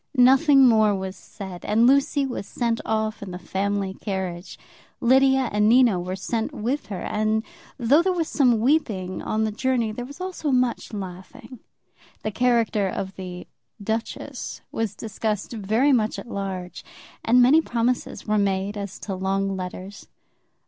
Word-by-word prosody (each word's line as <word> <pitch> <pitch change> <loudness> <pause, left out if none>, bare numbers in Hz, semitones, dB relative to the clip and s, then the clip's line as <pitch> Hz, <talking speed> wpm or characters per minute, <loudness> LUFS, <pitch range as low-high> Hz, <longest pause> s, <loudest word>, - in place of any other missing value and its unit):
Nothing 270 +2 +6
more 215 -3 +4
was 190 0 -5
said, 190 -2 -10
and 220 +3 +3
Lucy 280 +2 +3
was 245 -6 -5
sent 230 0 -1
off 220 0 -1
in 200 - -6
the 180 - -6
family 195 +2 -2
carriage. 190 -3 -5 0.4
Lydia 265 +1 +4
and 210 +1 +3
Nina 235 -6 +5
were 180 +1 -4
sent 220 +4 -2
with 245 +2 -3
her, 200 -3 -5
and 215 +1 0 0.3
though 275 +5 +4
there 375 +2 +1
was 340 -3 -1
some 250 -8 +3
weeping 215 - 0
on 220 0 -1
the 215 - 0
journey, 235 0 0
there 240 +3 -5
was 285 +6 -10
also 365 -4 -3
much 250 -2 0
laughing. 210 +6 -8 0.6
The 215 - -2
character 230 -4 +2
of 190 +1 -4
the 180 -1 -7 0.3
"duchess" 220 +2 -4
was 225 -3 -2
discussed 215 +1 -3
very 225 +6 +2
much 220 -3 +1
at - - -8
large, 190 -2 -5 0.4
and 245 +2 +4
many 265 +6 +6
promises 240 -3 -2
were 215 -1 +1
made 200 +1 0
as 200 -1 -5
to 200 - -4
long 195 +1 -1
letters. 185 +2 -7
215 Hz, 155 wpm, -24 LUFS, 195-250 Hz, 0.6 s, Nothing